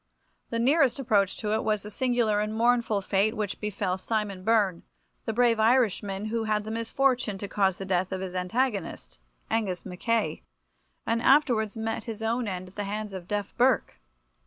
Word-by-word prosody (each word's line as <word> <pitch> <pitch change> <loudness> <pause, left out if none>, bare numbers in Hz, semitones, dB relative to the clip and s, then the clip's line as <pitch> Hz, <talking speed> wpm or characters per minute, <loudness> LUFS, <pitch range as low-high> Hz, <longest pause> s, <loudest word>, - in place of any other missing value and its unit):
The 230 - -2
nearest 265 +1 +3
approach 210 -8 +1
to 210 -1 -2
it 220 - 0
was 215 -2 0
the 210 - -8
singular 240 -3 +1
and 215 +1 -2
mournful 235 -3 +2
fate 200 +3 +1
which 210 -2 -3
befell 195 -3 -2
Simon 205 -2 -2
Byrne, 205 -5 +2 0.4
the - - -1
brave 235 0 +3
Irishman, 215 -4 +2
who 225 +1 -2
had 210 -1 0
the 215 - -6
misfortune 230 -1 0
to 200 - -5
cause 195 -2 +1
the 195 - -6
death 185 0 0
of 190 - -2
his 185 -1 -5
antagonist, 185 - -2 0.3
Angus 200 -6 -1
Mackay, 220 +5 -1 0.6
and 230 0 0
afterwards 240 -6 +3
met 225 0 -3
his 225 -1 -6
own 230 +1 0
end 185 -1 -5
at 185 - -22
the 205 - -2
hands 210 0 -4
of 180 -2 -7
Deaf 205 0 -3
Burke. 245 - +2
215 Hz, 180 wpm, -27 LUFS, 195-230 Hz, 0.6 s, nearest